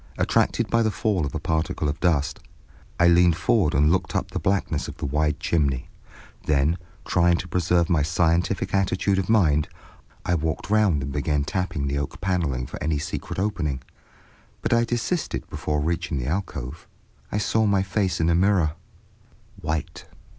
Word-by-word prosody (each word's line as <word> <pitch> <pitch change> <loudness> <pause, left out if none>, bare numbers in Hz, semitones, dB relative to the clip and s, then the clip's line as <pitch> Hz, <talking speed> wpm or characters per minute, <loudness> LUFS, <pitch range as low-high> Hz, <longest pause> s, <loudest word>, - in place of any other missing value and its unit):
Attracted - - +1
by 115 - +2
the 110 - +2
fall 105 -7 0
of 70 - -7
a - - -1
particle 80 0 -1
of 75 +2 -2
dust, 75 -5 +1 0.6
I 85 - +6
leaned 85 -1 +5
forward 95 -8 +2
and 75 +3 +4
looked 95 - 0
up - - -1
the - - -2
blackness 95 0 0
of - - -8
the - - -4
wide 75 +1 0
chimney. 75 -7 0 0.6
Then, 75 +4 +2 0.3
trying 85 0 +3
to 90 - -5
preserve 85 -1 +1
my 80 -3 +2
scientific 85 +5 +1
attitude 95 0 +1
of 95 - -3
mind, 80 -9 +3 0.6
I 90 - +1
walked 80 +3 -2
round 100 -10 +3
and 70 - -4
began 75 +1 0
tapping 85 -2 -2
the 70 +1 -1
oak 70 - -5
paneling 85 -9 -1
for - - -8
any 75 0 0
secret 70 - -5
opening, 80 -10 -1 0.8
but - - +1
I 120 0 +3
desisted 120 +9 -2
before 75 -1 -2
reaching 85 0 -1
the 60 - -3
alcove. 75 -5 -4 0.4
I - - -1
saw 110 +1 +2
my 100 -2 +3
face 95 -2 -1
in 80 - +2
a 85 - +3
mirror—white. 85 -3 -3
85 Hz, 170 wpm, -24 LUFS, 75-95 Hz, 0.8 s, I